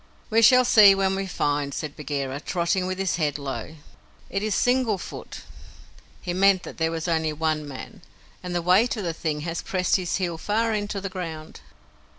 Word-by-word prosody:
"We 225 Hz, +1 st, +4 dB
shall 255 Hz, +2 st, +7 dB
see 205 Hz, -4 st, +7 dB
when 195 Hz, 0 st, +1 dB
we 195 Hz, 0 st, -3 dB
find," 145 Hz, -5 st, -1 dB
said 150 Hz, -3 st, -5 dB
Bagheera, 140 Hz, -2 st, -4 dB
trotting 180 Hz, +3 st, -1 dB
with 185 Hz, 0 st, -3 dB
his 190 Hz, -3 st, -1 dB
head 150 Hz, -4 st, 0 dB
low. 140 Hz, +2 st, -6 dB, 0.6 s
"It 195 Hz, -, -1 dB
is 215 Hz, -1 st, -1 dB
single 245 Hz, -4 st, +2 dB
foot" -, -, -9 dB, 0.8 s
(he 175 Hz, -, -3 dB
meant 190 Hz, 0 st, +4 dB
that -, -, -10 dB
there 160 Hz, 0 st, +1 dB
was 165 Hz, +1 st, -4 dB
only 160 Hz, -2 st, 0 dB
one 155 Hz, -1 st, -1 dB
man), 135 Hz, -2 st, -9 dB, 0.4 s
"and 180 Hz, -1 st, -5 dB
the 175 Hz, -, -1 dB
weight 200 Hz, +8 st, +3 dB
of 210 Hz, -, -3 dB
the 170 Hz, -2 st, -2 dB
thing 155 Hz, -2 st, -3 dB
has 165 Hz, +1 st, -3 dB
pressed 185 Hz, 0 st, +1 dB
his 180 Hz, -3 st, -2 dB
heel 175 Hz, -3 st, -2 dB
far 220 Hz, +5 st, 0 dB
into 205 Hz, -1 st, -3 dB
the 195 Hz, -, -3 dB
ground." 165 Hz, -4 st, -7 dB
180 Hz, 190 wpm, -24 LUFS, 155-195 Hz, 0.8 s, shall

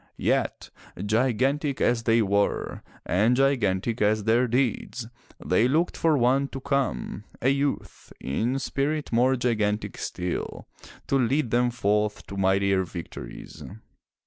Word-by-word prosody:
Yet -, -, -1 dB, 0.3 s
gigantic 130 Hz, +6 st, +1 dB
as 120 Hz, -1 st, +2 dB
they 115 Hz, 0 st, +4 dB
were, 100 Hz, 0 st, 0 dB, 0.2 s
and 110 Hz, +7 st, +3 dB
gigantic 120 Hz, -5 st, +1 dB
as 105 Hz, 0 st, +2 dB
their 115 Hz, +4 st, +3 dB
deeds, 125 Hz, -1 st, -1 dB, 0.4 s
they 105 Hz, +7 st, +3 dB
looked 160 Hz, +7 st, +1 dB
for 160 Hz, -3 st, +2 dB
one 130 Hz, +3 st, +2 dB
to 135 Hz, -, -7 dB
come, 135 Hz, -5 st, -2 dB, 0.2 s
a 130 Hz, -, +2 dB
youth, 140 Hz, +1 st, -2 dB
in 115 Hz, -, -1 dB
spirit 140 Hz, +2 st, -2 dB
more 125 Hz, +3 st, +3 dB
gigantic 110 Hz, -4 st, -1 dB
still, 90 Hz, 0 st, -4 dB, 0.4 s
to 135 Hz, -, +1 dB
lead 130 Hz, 0 st, +1 dB
them 120 Hz, +1 st, +3 dB
forth 105 Hz, -2 st, 0 dB
to 100 Hz, -, -8 dB
mightier 95 Hz, 0 st, +2 dB
victories. 85 Hz, -8 st, -9 dB
120 Hz, 125 wpm, -26 LUFS, 105-135 Hz, 0.4 s, they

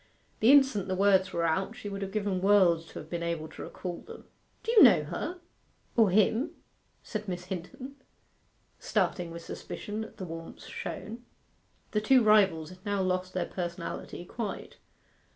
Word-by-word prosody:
The 225 Hz, +4 st, +6 dB
instant 265 Hz, -9 st, +5 dB
the 185 Hz, -, -1 dB
words 190 Hz, -1 st, +4 dB
were 170 Hz, 0 st, 0 dB
out 190 Hz, +7 st, 0 dB
she 245 Hz, -4 st, -8 dB
would 200 Hz, 0 st, -5 dB
have 195 Hz, -1 st, -4 dB
given 200 Hz, -3 st, -1 dB
worlds 185 Hz, -5 st, +4 dB
to -, -, -15 dB
have 155 Hz, -, -8 dB
been 170 Hz, +1 st, -4 dB
able 170 Hz, -2 st, -2 dB
to -, -, -10 dB
recall 175 Hz, -2 st, -6 dB
them. 460 Hz, -, -11 dB, 0.4 s
'Do 460 Hz, -, -1 dB
you 460 Hz, -, +7 dB
know -, -, +8 dB
her 360 Hz, +1 st, -5 dB, 0.6 s
or 225 Hz, -4 st, +5 dB
him?' 215 Hz, -, +2 dB, 0.5 s
said 215 Hz, -1 st, -5 dB
Miss 180 Hz, -1 st, -4 dB
Hinton, 255 Hz, -, -7 dB, 0.8 s
starting 175 Hz, -3 st, 0 dB
with 170 Hz, 0 st, -8 dB
suspicion 210 Hz, +1 st, -5 dB
at 220 Hz, -, -12 dB
the 190 Hz, -, -5 dB
warmth 165 Hz, -1 st, -8 dB
shown. 230 Hz, +3 st, -6 dB, 0.7 s
The 210 Hz, -, +1 dB
two 250 Hz, +3 st, +5 dB
rivals 190 Hz, -7 st, +4 dB
had 185 Hz, 0 st, -14 dB
now 200 Hz, -2 st, 0 dB
lost 185 Hz, 0 st, -1 dB
their 185 Hz, -, 0 dB
personality 175 Hz, -1 st, -5 dB
quite. 215 Hz, +2 st, -6 dB
190 Hz, 170 wpm, -29 LUFS, 175-215 Hz, 0.8 s, know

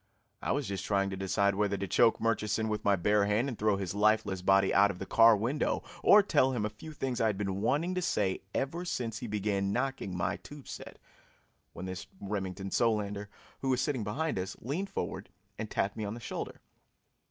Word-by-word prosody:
I -, -, -1 dB
was 145 Hz, -2 st, 0 dB
just 95 Hz, -2 st, -3 dB
trying 100 Hz, -1 st, +1 dB
to -, -, -3 dB
decide 100 Hz, +1 st, +1 dB
whether 100 Hz, 0 st, 0 dB
to 100 Hz, 0 st, -3 dB
choke 115 Hz, +5 st, +4 dB
Murchison 110 Hz, -1 st, 0 dB
with 105 Hz, 0 st, -2 dB
my 100 Hz, -1 st, +4 dB
bare 105 Hz, +3 st, +2 dB
hand 105 Hz, +6 st, +1 dB
and 130 Hz, -, -3 dB
throw 105 Hz, -2 st, +1 dB
his 95 Hz, -2 st, -3 dB
lifeless 105 Hz, -2 st, +2 dB
body 95 Hz, +1 st, +4 dB
out 100 Hz, +1 st, +6 dB
of 95 Hz, -, -4 dB
the 95 Hz, -, -5 dB
car 115 Hz, +2 st, +6 dB
window, 125 Hz, +8 st, 0 dB, 0.2 s
or 210 Hz, 0 st, +7 dB
tell 130 Hz, -8 st, +3 dB
him 110 Hz, -4 st, -1 dB
a 105 Hz, -, -3 dB
few 110 Hz, +9 st, -10 dB
things 135 Hz, -5 st, -2 dB
I 115 Hz, -, +4 dB
had 105 Hz, -3 st, 0 dB
been 95 Hz, -1 st, -2 dB
wanting 150 Hz, -, +1 dB
to 185 Hz, -, -1 dB
say 100 Hz, -, 0 dB
ever 150 Hz, +10 st, -2 dB
since 115 Hz, -, -3 dB
he 120 Hz, -, -5 dB
began 100 Hz, -2 st, 0 dB
knocking 125 Hz, -6 st, -2 dB
my 85 Hz, -, -1 dB
tube 145 Hz, -2 st, -12 dB
set, -, -, -8 dB, 0.8 s
when 95 Hz, -, -7 dB
this 95 Hz, 0 st, -6 dB
Remington 95 Hz, -1 st, -4 dB
Solander, 105 Hz, -3 st, 0 dB, 0.3 s
who 135 Hz, -, -2 dB
was 130 Hz, -1 st, +2 dB
sitting 135 Hz, -6 st, -1 dB
behind 140 Hz, +4 st, -1 dB
us, 95 Hz, +1 st, -4 dB
leaned 165 Hz, -, -3 dB
forward 95 Hz, -, -4 dB, 0.3 s
and 110 Hz, -1 st, -4 dB
tapped 100 Hz, -, -1 dB
me 110 Hz, -, -4 dB
on 105 Hz, +2 st, -3 dB
the -, -, -8 dB
shoulder. -, -, -6 dB
105 Hz, 210 wpm, -31 LUFS, 100-125 Hz, 0.8 s, or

